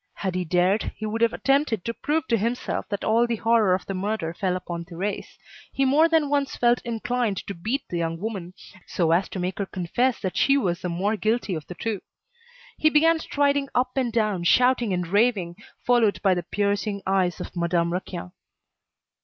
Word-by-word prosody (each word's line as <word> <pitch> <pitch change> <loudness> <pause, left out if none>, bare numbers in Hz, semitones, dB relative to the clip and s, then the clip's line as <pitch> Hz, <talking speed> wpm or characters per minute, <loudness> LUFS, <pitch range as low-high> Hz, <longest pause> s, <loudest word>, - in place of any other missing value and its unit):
Had 190 -2 -3
he 180 0 -1
dared, 180 +4 +1
he 215 - -6
would 220 +2 -3
have 230 0 +4
attempted 270 -9 +1
to 230 - -2
prove 310 +2 -1
to 235 - +4
himself 230 +3 -2
that 200 -2 -3
all 230 +2 +3
the 235 - 0
horror 225 -4 +3
of 185 - -6
the 195 - -4
murder 190 -3 -2
fell 180 0 -1
upon 170 -2 -5
Thérèse. 180 +5 -5 0.3
He 270 - +1
more 300 +5 +4
than 320 -3 +3
once 280 -1 0
felt 240 0 +2
inclined 235 -2 -1
to 200 - -5
beat 225 +11 -2
the 175 - -3
young 165 0 -2
woman, 185 -3 -5 0.3
so 165 -3 0
as 175 +3 +2
to - - -6
make 185 +2 -3
her 200 - -1
confess 225 +9 0
that 185 -2 -3
she 275 +6 +4
was 185 -8 -1
the 180 - -3
more 190 +6 0
guilty 215 -1 0
of 155 -3 -5
the 180 - -8
two. 215 0 -3 0.8
He 310 - +5
began 320 +2 +4
striding 285 -2 0
up 250 +1 +2
and 255 -3 0
down, 215 -6 0
shouting 250 +2 +3
and 180 -1 -1
raving, 195 -2 +1 0.3
followed 235 -4 +3
by 195 -2 +4
the 175 - -1
piercing 205 +1 -1
eyes 190 -2 +1
of - - -7
Madame 170 0 0
Raquin. 180 -1 -5
205 Hz, 200 wpm, -24 LUFS, 180-245 Hz, 0.8 s, He